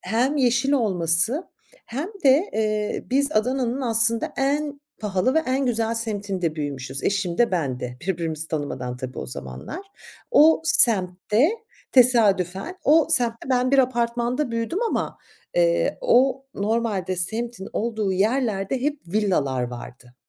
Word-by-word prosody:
Hem 245 +9 0
yeşil 255 +1 +2
olması 195 - +3 0.4
hem 285 - -4 0.2
de, 280 +9 +4
eee, 215 -1 -2
biz 280 +3 +1
Adana'nın 250 +3 0
aslında 230 -1 +3
en 285 +1 -1 0.2
pahalı 210 +5 0
ve - - +4
en 260 +1 0
güzel 230 -1 0
semtinde 200 -7 -3
büyümüşüz. 140 -2 -5
Eşim 195 -4 -1
de 240 - +3
ben 140 -9 -2
de. 125 0 -6
Birbirimizi 160 -4 -3
tanımadan 140 -5 -4
tabii 130 0 -7
o - - -5
zamanlar. 65 - -7 0.5
O 320 -8 +5
semtte 215 - +4 0.4
tesadüfen, 230 - +3
o 310 +2 +4
semtte 235 0 +2
ben 255 0 +1
bir 275 - +3
apartmanda 240 +1 0
büyüdüm 230 - -2
ama, 460 - -2 0.4
eee, - - +1
o 270 - +2
normalde 205 -4 -2
semtin 220 +2 -3
olduğu 220 -3 -2
yerlerde 215 +2 0
hep 295 0 -1
villalar 170 -10 0
vardı. 125 +1 -9
225 Hz, 130 wpm, -23 LUFS, 180-265 Hz, 0.5 s, O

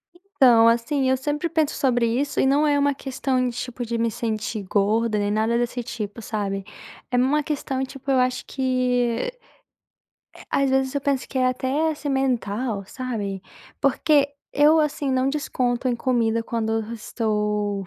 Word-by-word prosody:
Então, 260 - +4
assim, 260 +4 +2
eu 260 - +3
sempre 295 +5 -2
penso 315 -3 +1
sobre 245 -3 +2
isso 270 +5 -1
e - - +4
não 285 +3 +3
é 290 -1 +3
uma 285 0 +2
questão, 260 -2 -1
tipo, 245 +1 -5
de 235 +1 -2
me 230 0 0
sentir 220 -1 -3
gorda 210 +3 +1
nem 205 0 0
nada 220 +2 +1
desse 240 +1 -1
tipo, 230 -2 -6
sabe, 200 -3 -3 0.5
é 245 - +2
uma 275 +4 +3
questão, 270 -3 -2
tipo, 275 +1 -5
eu 265 - +4
acho 250 0 0
que, 250 -3 0 1.2
eh, - - -14
às 275 -1 +2
vezes 265 0 +1
eu 285 - 0
penso 275 -2 -1
que - - -8
é 255 - +3
até, 265 +5 0
assim, 300 -1 -5
mental, 245 -5 -1
sabe, 205 -6 -4 0.4
porque 285 +1 +3 0.2
eu, 300 +2 +5
assim, 290 -2 -1
não 260 0 +2
desconto 255 -3 -1
em 245 - +2
comida 230 -2 +1
quando 225 -1 -2
eu 225 0 -2
estou, 210 -3 -2
250 Hz, 170 wpm, -23 LUFS, 225-275 Hz, 1.2 s, eu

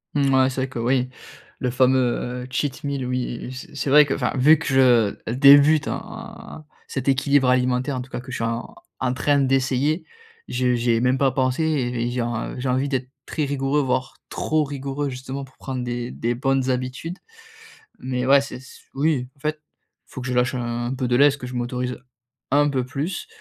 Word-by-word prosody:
Mouais, 135 -2 +3
c'est 130 0 -3
vrai 135 - -2
que 125 - -6
oui. 125 +2 +1 0.5
Le 125 - 0
fameux 125 -1 +1
cheat 135 +1 -2
meal 140 -3 -2
oui, 125 -1 -3
c 130 0 -9
c'est 140 - -2
vrai 150 +1 +7
que 135 - -1
enfin - - -1
vu 150 +5 +6
que 160 - -7
je 120 -5 +3
débute 140 +3 +6
en 155 - -8 0.2
cet 135 -1 -4
équilibre 135 -1 +3
alimentaire 125 +2 +1
en - - -3
tout 130 - -10
cas, - - -5
que 130 0 -10
je - - -3
suis 115 - -3
en 115 +1 -3 0.3
en 125 -1 0
train 145 +2 +2
d'essayer. 135 +4 +1 0.4
J 125 0 +1
j'y 120 0 +1
ai 115 0 +2
même 125 +1 +2
pas 135 -2 +3
pensé 130 +3 0
et 125 -6 0
j'ai 125 0 -2
en 120 +1 -4
j'ai 130 +1 -2
envie 130 +3 +1
d'être 130 -2 -2 0.2
très 155 - -2
rigoureux 140 +1 0
,voire 130 -1 -2
trop 155 -1 0
rigoureux 140 0 -3
justement 130 +1 -6
pour 130 - -15
prendre 130 -2 -4
des 120 0 -3
des 120 +1 -2
bonnes 135 +1 0
habitudes. 130 +8 -4 0.8
Mais 125 -1 -3
ouais 140 +1 +6
c'est 140 - -7
s 130 +1 -14
oui 140 -3 0
en - - -26
fait, 155 +1 -2 0.5
faut 130 - -9
que 125 - -5
je 125 - -2
lâche 125 0 +2
un 120 +1 -2
peu 130 -1 -2
de 120 - +1
lest, 145 +2 +5
que 125 - -6
je 125 - -7
m'autorise 125 +1 -3 0.5
un 145 +1 +4
peu 130 -3 -1
plus 145 - -4
130 Hz, 200 wpm, -23 LUFS, 125-140 Hz, 0.8 s, vrai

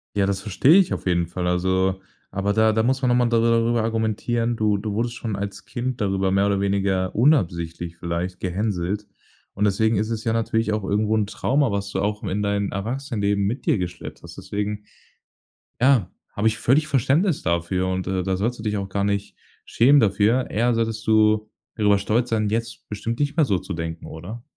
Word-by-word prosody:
Ja, 100 -1 +2
das 95 -1 -1
verstehe 110 - +3
ich 195 -3 +3
auf - - -5
jeden 85 -1 +2
Fall. 90 +1 -3
Also 95 +1 +1 0.3
aber 100 +1 -1
da 110 0 +3
da 110 - +2
muss 130 +3 +1
man 125 - +2
noch 120 - +3
mal 120 -1 +3
darüber 115 0 +2
argumentieren, 115 +1 -1
du 105 -2 +2
du 105 +1 -4
wurdest 115 +3 -1
schon 110 -4 -4
als 100 0 -5
Kind 125 -1 -4
darüber 95 -1 0
mehr 100 +1 +3
oder 100 -1 +1
weniger 95 -2 0
unabsichtlich 85 - +1
vielleicht 85 +2 -4
gehänselt. 100 +1 -2 0.5
Und 100 - -2
deswegen 110 +2 +2
ist 110 +2 -1
es 110 -1 -3
ja 115 - +1
natürlich 115 -1 0
auch 105 - -2
irgendwo 105 +2 +1
'n 105 -2 +1
Trauma, 135 +4 0
was 100 0 -3
du - - -2
auch 105 +1 -2
in 100 +2 -2
dein 100 -1 -1
Erwachsenenleben 105 -2 -1
mit 115 +7 -3
dir - - +3
geschleppt 90 -1 -6
hast. - - -11
Deswegen 105 0 -3 1.0
ja, 125 -9 +4 0.2
habe 105 +2 +1
ich 110 - 0
völlig 150 +5 +2
Verständnis 150 - +2
dafür 85 +2 0
und, 95 0 -2
äh, 95 -1 0
da 95 0 -1
sollst 115 +4 -2
du - - -7
dich 105 -1 -1
auch 100 -1 -3
gar 100 +1 -2
nicht 100 0 -2 0.3
schämen 140 +5 +5
dafür, 110 +4 +2
eher 120 +3 +1
solltest 115 0 -2
du 110 0 +3 0.3
darüber 105 -2 +3
stolz 115 +5 0
sein, 110 -2 0
jetzt 115 +1 -3
bestimmt 115 +3 -4
nicht 145 0 0
mehr 160 - +4
so 95 - +2
zu 95 - -6
denken, 80 0 -5
oder? 100 +9 -8
105 Hz, 200 wpm, -23 LUFS, 95-115 Hz, 1.0 s, schämen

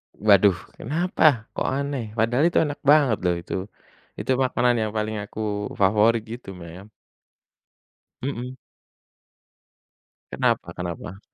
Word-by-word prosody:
Waduh! 100 -2 +5 0.2
Kenapa, 155 -4 +2
kok - - -2
aneh 135 -5 -3
padahal 120 +7 +2
itu 175 - +2
enak 145 -2 -4
banget 140 -8 +4
loh 90 -1 +2
itu. 85 0 -7 0.7
Itu - - -2
makanan 125 -1 +2
yang 110 -1 -1
paling 110 0 -2
aku 105 -1 -4
favorit 110 +3 +3
gitu 115 -1 -9
mem. 90 +3 -11 1.3
Mhm. 125 -1 -4 1.8
Kenapa - - 0
kenapa? 90 +2 -6
110 Hz, 110 wpm, -24 LUFS, 100-130 Hz, 1.8 s, Waduh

